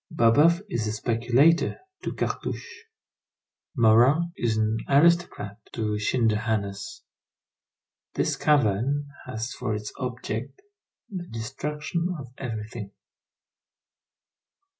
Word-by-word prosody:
Babeuf 160 - +4
is 115 - -2
a 105 - -1
speculator 120 +9 +3 0.2
to - - -3
Cartouche; 465 -1 -4 0.9
Marat 125 +8 +5
is 115 -2 0
an 110 +1 +1
aristocrat 145 - +3
to 105 -2 -1
Schinderhannes. 110 - 0 1.1
This - - +1
cavern 140 +1 +2 0.2
has 120 0 -4
for 110 -4 -2
its 105 0 -6
object 125 - -4 0.5
the 185 -5 -6
destruction 150 +9 -3
of 125 -4 -10
everything. 110 -3 -5
120 Hz, 90 wpm, -26 LUFS, 110-150 Hz, 1.1 s, Marat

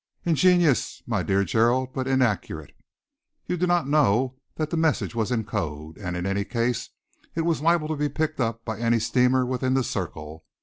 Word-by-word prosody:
"Ingenious, 175 -3 +3
my 110 -5 0
dear 95 +3 +1
Gerald, 120 +6 +2
but 130 -1 -2
inaccurate. 130 -6 0 0.7
You 180 - -1
do 180 +1 0
not 175 -4 +2
know 130 -3 +2 0.2
that 155 -1 -3
the - - 0
message 160 -7 +1
was 115 0 -1
in 115 -3 0
code, 80 -6 -5
and 90 -3 -4
in 90 - -3
any 100 +1 0
case 120 +2 -1 0.5
it 165 - 0
was 165 -3 0
liable 165 -1 +2
to 155 - -1
be 145 0 -1
picked 155 +1 -2
up 115 -1 -2
by 110 -2 -4
any 115 0 +2
steamer 125 +3 +2
within 130 +1 0
the 135 - +2
circle. 80 -6 -5
125 Hz, 185 wpm, -25 LUFS, 105-155 Hz, 0.7 s, Ingenious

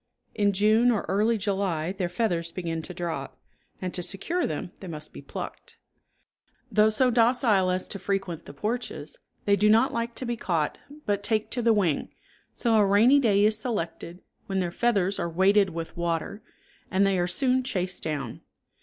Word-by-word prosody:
In 205 -1 +2
June 215 +5 +4
or 225 -4 +1
early 215 +4 +2
July 190 -5 -1
their 190 -2 -3
feathers 175 -4 -1
begin 165 -2 -3
to 170 - -9
drop, 165 -6 -4 0.4
and 185 -1 -4
to 180 - -3
secure 195 - -1
them 155 +3 -4
they 190 - -9
must 155 -3 -8
be - - -9
plucked. - - -8 0.9
Though 215 0 +5
so 250 +4 +2
docile 230 -5 +3
as 185 0 -1
to 200 - -5
frequent 190 -3 -3
the - - -10
porches, 245 - -4 0.3
they 200 - +4
do 210 +1 +3
not 230 +6 +4
like 235 -1 -2
to 255 - -4
be 240 0 -1
caught, 165 -8 -1 0.3
but 205 -1 0
take 215 +1 -1
to 245 - -1
the 230 0 +4
wing, 190 -9 +1 0.4
so 230 -3 +1
a 210 - +5
rainy 215 +8 +5
day 205 -5 +3
is 215 0 +3
selected, 180 -6 -4 0.2
when 195 - -2
their 180 -2 0
feathers 200 -3 +1
are 170 - -1
weighted 190 +3 +4
with 165 -1 -6
water, 170 +4 -2 0.5
and 190 +1 +3
they 195 -2 +2
are 175 - +1
soon 255 +8 +1
chased 185 -8 -3
down. 145 -7 -4
200 Hz, 180 wpm, -26 LUFS, 175-225 Hz, 0.9 s, Though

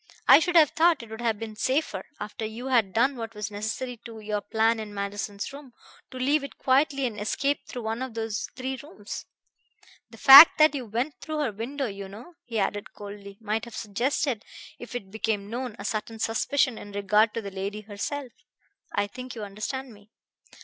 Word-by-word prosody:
I - - +10
should 350 +2 -1
have 310 -4 +7
thought 330 -4 +3
it 225 - -13
would 220 +1 -7
have 225 -3 +1
been 220 0 -7
safer, 260 -4 -1
after 210 +2 -6
you 225 +4 -5
had 230 -7 +3
done 260 +7 +2
what 225 -1 -6
was 210 0 -4
necessary 225 +4 -4
to 225 -1 -10
your 210 -1 -2
plan 225 +2 +1
in 210 -1 -7
Manderson's 200 +3 -4
room, 280 -3 -11 0.4
to 255 - -9
leave 280 +3 +2
it 280 - -8
quietly 275 +1 +2
and 215 -4 -4
escape 280 +7 -1
through 245 -3 -6
one 225 +2 -3
of 260 -3 -5
those 225 -2 -3
three 260 0 -4
rooms.... 210 -9 -8 0.8
The - - -14
fact 280 +4 +11
that 310 0 +6
you 265 -4 -4
went 245 +8 -3
through 310 +2 -4
her 265 -6 0
window, 255 +7 -4
you 200 -3 -6
know," 230 - -11
he 230 -2 -4
added 205 0 -2
coldly, 200 -1 -10
"might 220 +1 -2
have 235 -2 -10
suggested, 235 +3 -1 0.4
if 245 0 -9
it 195 -6 -6
became 210 -1 -2
known, 245 -2 -4
a 200 - -8
certain 220 +1 -3
suspicion 230 +3 +1
in 205 - -10
regard 210 +2 +2
to 230 - -1
the 200 - -6
lady 200 +2 -4
herself. 230 +6 -5 0.6
I 205 - +2
think 250 +4 -8
you 220 - -6
understand 220 +6 -5
me." 205 0 -19
225 Hz, 200 wpm, -27 LUFS, 210-260 Hz, 0.8 s, fact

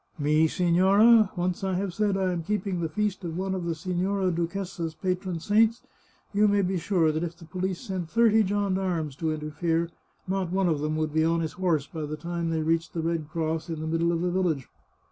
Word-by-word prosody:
" - - -35
Me, 155 +1 +3
signora! 190 +6 +5
Once 180 +1 -2
I 190 -1 0
have 190 -1 -2
said 205 -1 +1
I 190 -1 +1
am 175 -1 -2
keeping 195 0 -2
the 165 -1 -1
feast 205 +2 -2
of 165 -1 -4
one 190 +1 -1
of 185 -2 -3
the 170 -1 -1
Signora 185 +3 -1
Duchessa's 170 -1 -3
patron 185 -2 -2
saints, 220 +5 +2 0.5
you 210 +1 +4
may 205 -1 +3
be 185 0 0
sure 165 -3 +2
that 155 +2 -2
if 170 0 -5
the 170 - -13
police 185 +2 -3
sent 185 -4 -4
thirty 225 0 +4
gendarmes 190 -7 -1
to 160 -1 -1
interfere, 160 +2 -1 0.4
not 190 -1 -1
one 190 0 +2
of 160 -4 +1
them 155 +1 -1
would 155 -1 -1
be 160 0 +3
on 165 +1 +2
his 160 - -2
horse 170 -6 0
by 160 +1 -7
the 155 +1 -5
time 170 0 -3
they 160 -1 0
reached 165 +1 0
the 165 - -1
red 165 -2 -2
cross 160 0 -2
in 160 -2 -3
the 155 - -4
middle 165 +1 +1
of 170 -1 -1
the 180 0 0
village. 175 -8 0
175 Hz, 220 wpm, -27 LUFS, 160-190 Hz, 0.5 s, signora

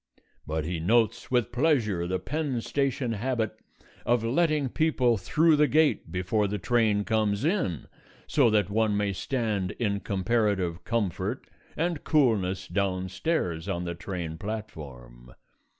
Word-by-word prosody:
But 80 0 -2
he 85 0 -2
notes 110 +6 +1
with 120 -2 +1
pleasure 120 - +1
the 95 +1 0
Penn 135 - -2
Station 135 -1 -1
habit 115 0 -1 0.5
of 120 -1 +2
letting 150 +3 +2
people 130 -6 +2
through 155 - +3
the 150 0 +4
gate 150 - +2
before 95 +4 0
the 105 +1 -2
train 110 0 +2
comes 110 +1 0
in, 160 - 0 0.4
so 135 -6 +3
that 105 -3 +2
one 110 -1 +2
may 100 -1 0
stand 105 -4 -1
in 100 -4 0
comparative 100 -4 0
comfort 105 - -2 0.3
and 165 -1 -1
coolness 100 - +2
downstairs 95 - -1
on 90 -2 -2
the 85 -1 -3
train 85 -2 -5
platform. 70 - -8
105 Hz, 135 wpm, -27 LUFS, 95-125 Hz, 0.5 s, the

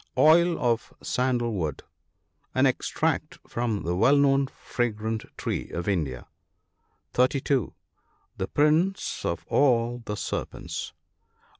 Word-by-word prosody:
Oil 170 +2 +5
of 120 -4 0
sandal 125 -2 0
wood. 80 -8 -3 0.4
— - - -43
An - - +4
extract - - 0
from 115 -3 -2
the 85 +1 -1
well 125 +10 +5
known 140 -1 +4
fragrant 110 -4 -3
tree - - -3
of 85 +2 -4
India. 75 -11 -1 0.9
(32.) 130 -1 +1 0.6
The 95 - -2
prince 160 +6 +1
of 85 0 -2
all 120 -3 +2
the 105 -2 -4
serpents. - - -4
120 Hz, 115 wpm, -26 LUFS, 105-140 Hz, 0.9 s, Oil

